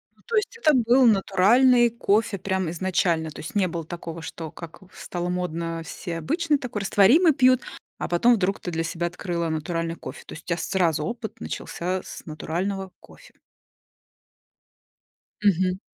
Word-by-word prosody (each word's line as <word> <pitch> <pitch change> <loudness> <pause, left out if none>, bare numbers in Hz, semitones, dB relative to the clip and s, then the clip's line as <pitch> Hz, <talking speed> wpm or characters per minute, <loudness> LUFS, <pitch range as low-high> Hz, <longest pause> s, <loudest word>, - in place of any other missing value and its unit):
Ну, - - -27
то 470 - -3
есть 450 +2 0
это 310 -10 +4
был 250 0 +4
натуральный 235 +5 +5
кофе 220 -2 +1
прям 190 -2 -1
изначально? 170 -2 0
То 150 - -11
есть 160 - -8
не 195 -2 +3
было 165 -2 -5
такого, 170 0 -7
что, 160 0 -7
как 170 +1 -11
ф 185 - -21
стало 175 0 -4
модно: 170 -2 -3
все 170 -1 -6
обычный 305 - 0
такой, 245 -6 -5
растворимый 255 - +5
пьют, 255 -1 +4 0.4
а - - -3
потом 235 +8 +4
вдруг 195 -2 0
ты 175 - -5
для 165 0 -1
себя 170 +1 -2
открыла 170 -1 -3
натуральный 165 +1 -2
кофе. - - -9
То - - -10
есть 165 - -10
у - - -40
тя 170 -1 0
сразу 165 -3 0
опыт 230 0 -6
начался 185 +2 -4
с - - -10
натурального 185 +5 -3
кофе. - - -17 2.1
Мгм. 185 -1 +2
185 Hz, 165 wpm, -24 LUFS, 170-230 Hz, 2.1 s, натуральный